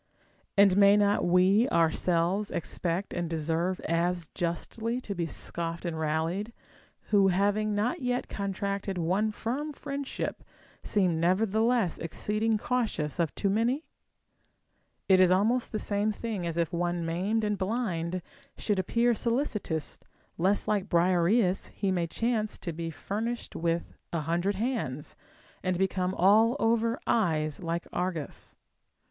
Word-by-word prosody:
And 195 Hz, -1 st, +6 dB
may 200 Hz, 0 st, +7 dB
not 205 Hz, 0 st, +3 dB
we 185 Hz, +7 st, +4 dB
ourselves 170 Hz, +4 st, +2 dB
expect 175 Hz, +3 st, -2 dB
and 175 Hz, -1 st, -2 dB
deserve 165 Hz, +3 st, -1 dB
as 170 Hz, 0 st, -1 dB
justly 220 Hz, +7 st, -2 dB
to 210 Hz, -5 st, -5 dB
be 170 Hz, -3 st, -2 dB
scoffed 170 Hz, +1 st, -4 dB
and 170 Hz, -2 st, -2 dB
rallied, 165 Hz, +8 st, -1 dB, 0.6 s
who 200 Hz, -2 st, +5 dB
having 205 Hz, +3 st, +1 dB
not 245 Hz, +10 st, 0 dB
yet 250 Hz, -1 st, -1 dB
con 200 Hz, -1 st, -3 dB
tracted 200 Hz, 0 st, -3 dB
one 185 Hz, +6 st, +1 dB
firm 255 Hz, +8 st, -3 dB
friendship 280 Hz, -1 st, -4 dB, 0.4 s
seem 180 Hz, -6 st, +1 dB
nevertheless 215 Hz, +3 st, +2 dB
exceeding 215 Hz, +6 st, -1 dB
cautious 210 Hz, -, -1 dB
of 165 Hz, -3 st, 0 dB
too 200 Hz, -, 0 dB
many? 240 Hz, +9 st, +1 dB, 1.2 s
It 190 Hz, -1 st, +6 dB
is 185 Hz, -1 st, +6 dB
almost 220 Hz, +7 st, +2 dB
the 215 Hz, -, -1 dB
same 210 Hz, 0 st, 0 dB
thing 210 Hz, -4 st, -4 dB
as 165 Hz, 0 st, -3 dB
if 170 Hz, -1 st, 0 dB
one 175 Hz, 0 st, -1 dB
maimed 190 Hz, +7 st, 0 dB
and 210 Hz, -1 st, +1 dB
blind 185 Hz, -4 st, -2 dB, 0.3 s
should 205 Hz, -3 st, 0 dB
appear 235 Hz, +6 st, +2 dB
solicitous 225 Hz, -, -2 dB, 0.4 s
lest 190 Hz, +4 st, +1 dB
like 205 Hz, -2 st, 0 dB
Briareus 180 Hz, +3 st, +3 dB
he 195 Hz, -2 st, 0 dB
may 175 Hz, -2 st, 0 dB
chance 220 Hz, +3 st, -1 dB
to 170 Hz, -, -5 dB
be 165 Hz, +1 st, -4 dB
furnished 220 Hz, +9 st, -4 dB
with 170 Hz, 0 st, -1 dB, 0.2 s
a 165 Hz, -, -1 dB
hundred 175 Hz, +6 st, 0 dB
hands, 200 Hz, -, -3 dB, 0.5 s
and 185 Hz, -2 st, 0 dB
become 185 Hz, 0 st, 0 dB
all 215 Hz, +6 st, +5 dB
over 230 Hz, +1 st, +2 dB
eyes 155 Hz, -9 st, +1 dB
like 170 Hz, 0 st, -2 dB
Argus. 175 Hz, -5 st, -4 dB
190 Hz, 135 wpm, -29 LUFS, 170-220 Hz, 1.2 s, may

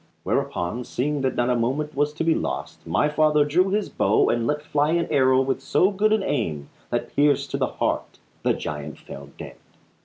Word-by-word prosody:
Whereupon, 90 Hz, +8 st, -2 dB
seeing 145 Hz, +4 st, -2 dB
that 130 Hz, -1 st, 0 dB
not 120 Hz, +1 st, +1 dB
a -, -, +2 dB
moment 135 Hz, +6 st, -1 dB
was 145 Hz, +1 st, +1 dB
to 155 Hz, -, -3 dB
be 165 Hz, 0 st, +3 dB
lost, 65 Hz, -, -4 dB
my -, -, +2 dB
father 150 Hz, -1 st, +3 dB
drew 180 Hz, +6 st, +2 dB
his 205 Hz, +1 st, 0 dB
bow 100 Hz, -, +2 dB
and 115 Hz, -1 st, 0 dB
let 150 Hz, 0 st, -1 dB
fly 150 Hz, +1 st, +1 dB
an 170 Hz, -1 st, +1 dB
arrow 130 Hz, -1 st, +4 dB
with 135 Hz, 0 st, -1 dB
so 185 Hz, +7 st, +2 dB
good 210 Hz, +2 st, +1 dB
an 215 Hz, -2 st, +2 dB
aim 80 Hz, -, -2 dB, 0.2 s
that -, -, -3 dB
pierced 145 Hz, 0 st, +2 dB
to -, -, -1 dB
the -, -, +1 dB
heart -, -, -2 dB, 0.2 s
the -, -, +2 dB
giant 75 Hz, 0 st, -6 dB
fell 70 Hz, +1 st, -11 dB
dead. -, -, -9 dB
145 Hz, 205 wpm, -24 LUFS, 120-150 Hz, 0.2 s, arrow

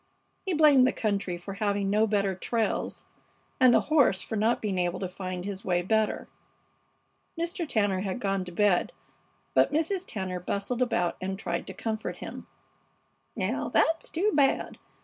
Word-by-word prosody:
He 370 Hz, -, +1 dB
blamed 290 Hz, -5 st, +6 dB
the -, -, +2 dB
country 200 Hz, -5 st, -1 dB
for 185 Hz, +3 st, -7 dB
having 200 Hz, -1 st, 0 dB
no 215 Hz, +2 st, +3 dB
better 200 Hz, -2 st, +1 dB
trails, 225 Hz, +4 st, -2 dB, 0.5 s
and 255 Hz, -2 st, +7 dB
the -, -, +5 dB
horse 280 Hz, -11 st, +3 dB
for 220 Hz, -, -4 dB
not 220 Hz, +3 st, +2 dB
being 195 Hz, -4 st, -2 dB
able 175 Hz, 0 st, -1 dB
to 190 Hz, -, -2 dB
find 185 Hz, 0 st, -5 dB
his 200 Hz, -1 st, -5 dB
way 175 Hz, -1 st, +1 dB
better. 220 Hz, +3 st, 0 dB, 1.1 s
Mr. 340 Hz, -1 st, -2 dB
Tanner 205 Hz, -4 st, +1 dB
had 195 Hz, +4 st, -3 dB
gone 195 Hz, -3 st, -1 dB
to 180 Hz, -, -8 dB
bed, 195 Hz, 0 st, +2 dB, 0.6 s
but -, -, +4 dB
Mrs. 330 Hz, +5 st, 0 dB
Tanner 190 Hz, -4 st, -4 dB
bustled 200 Hz, +7 st, -3 dB
about 180 Hz, -9 st, +1 dB
and 190 Hz, +1 st, -3 dB
tried 170 Hz, -3 st, -3 dB
to -, -, -8 dB
comfort 220 Hz, -1 st, -3 dB
him. -, -, -8 dB, 0.9 s
"Now -, -, -1 dB
that's 325 Hz, 0 st, +2 dB
too 390 Hz, +6 st, +1 dB
bad! 280 Hz, -2 st, +1 dB
205 Hz, 165 wpm, -28 LUFS, 190-250 Hz, 1.1 s, and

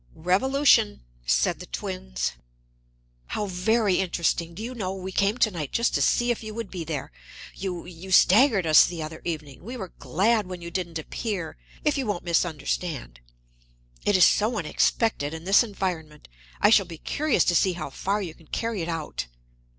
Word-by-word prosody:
"Revolution," 225 Hz, -, +3 dB, 0.3 s
said -, -, +2 dB
the -, -, -9 dB
twins. -, -, -3 dB, 1.0 s
"How 210 Hz, -, -2 dB
very 200 Hz, +2 st, +1 dB
interesting! 170 Hz, -2 st, -1 dB
Do 215 Hz, -, -6 dB
you 245 Hz, +3 st, -5 dB
know, 195 Hz, -5 st, -3 dB
we 190 Hz, 0 st, -6 dB
came 200 Hz, +4 st, +1 dB
to 215 Hz, -, +3 dB
night 155 Hz, -6 st, -5 dB
just 235 Hz, -, +1 dB
to -, -, +1 dB
see 240 Hz, 0 st, +3 dB
if 235 Hz, -, -3 dB
you 215 Hz, -1 st, -7 dB
would 230 Hz, -4 st, -5 dB
be 180 Hz, -3 st, -4 dB
there. 155 Hz, -4 st, -5 dB, 0.4 s
You 180 Hz, -3 st, -5 dB
you 180 Hz, +2 st, -10 dB
staggered 200 Hz, +1 st, +5 dB
us, 155 Hz, -1 st, +8 dB
the 170 Hz, -2 st, -3 dB
other 155 Hz, +1 st, -8 dB
evening. 155 Hz, -5 st, -5 dB
We 240 Hz, +6 st, -6 dB
were 190 Hz, -6 st, -7 dB
glad 200 Hz, -, +1 dB
when 180 Hz, -1 st, -6 dB
you 170 Hz, 0 st, -8 dB
didn't 170 Hz, -2 st, -3 dB
appear 180 Hz, +1 st, -4 dB, 0.3 s
if 295 Hz, -1 st, +2 dB
you 260 Hz, -, -2 dB
won't 205 Hz, -4 st, -2 dB
misunderstand. 160 Hz, -, -2 dB, 0.8 s
It 205 Hz, -, +3 dB
is 180 Hz, -, +8 dB
so 220 Hz, +3 st, +2 dB
unexpected, 160 Hz, -1 st, 0 dB
in 160 Hz, -, -8 dB
this 195 Hz, +3 st, +5 dB
environment. 180 Hz, -9 st, -4 dB, 0.3 s
I -, -, +6 dB
shall 200 Hz, -4 st, +5 dB
be 165 Hz, -2 st, -8 dB
curious 300 Hz, -, +1 dB
to 175 Hz, -, +2 dB
see 185 Hz, +2 st, +3 dB
how 160 Hz, -5 st, -6 dB
far 200 Hz, +7 st, -1 dB
you 170 Hz, -4 st, -6 dB
can 165 Hz, -1 st, -21 dB
carry 225 Hz, 0 st, -2 dB
it 165 Hz, -, -3 dB
out." 160 Hz, -, -4 dB
180 Hz, 180 wpm, -25 LUFS, 160-215 Hz, 1.0 s, us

